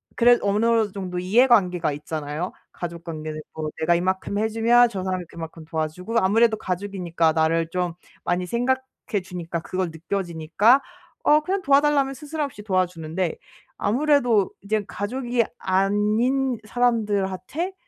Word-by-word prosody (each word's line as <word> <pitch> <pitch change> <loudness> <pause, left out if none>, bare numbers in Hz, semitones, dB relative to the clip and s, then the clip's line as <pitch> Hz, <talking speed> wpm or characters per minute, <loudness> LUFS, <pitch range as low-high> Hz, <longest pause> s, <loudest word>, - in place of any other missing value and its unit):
그래도 240 -3 +4
어느 220 +1 +2
정도 185 -2 -4
이해관계가 185 - +3
있잖아요. 150 +3 -4 0.2
가족 170 -1 -6
관계는 155 -2 -5
뭐 155 -1 -4
내가 170 +2 +3
이만큼 185 +3 -1
해 215 +1 +2
주면 235 +2 +4
저 195 -5 -4
사람이 185 -1 -2
그만큼 165 -1 -8
도와주고 160 +7 -3
아무래도 220 +3 +3
가족이니까 180 -4 -1
나를 160 +1 +1
좀 180 0 -1 0.3
많이 180 +1 0
생각해 245 -1 -2
주니까 175 -2 -5
그걸 185 +2 -2
느껴지니까 175 - +2 0.4
어 300 +1 +6
그냥 380 +5 -1
도와달라면 280 -2 +3
스스럼없이 290 -5 -5
도와주는데 180 -3 -1 0.4
아무래도 245 -4 +2
이제 210 +1 -1
가족이 240 +4 -1 0.2
아닌 215 +7 +1
사람들한테 215 - 0
195 Hz, 340 characters per minute, -24 LUFS, 175-240 Hz, 0.4 s, 어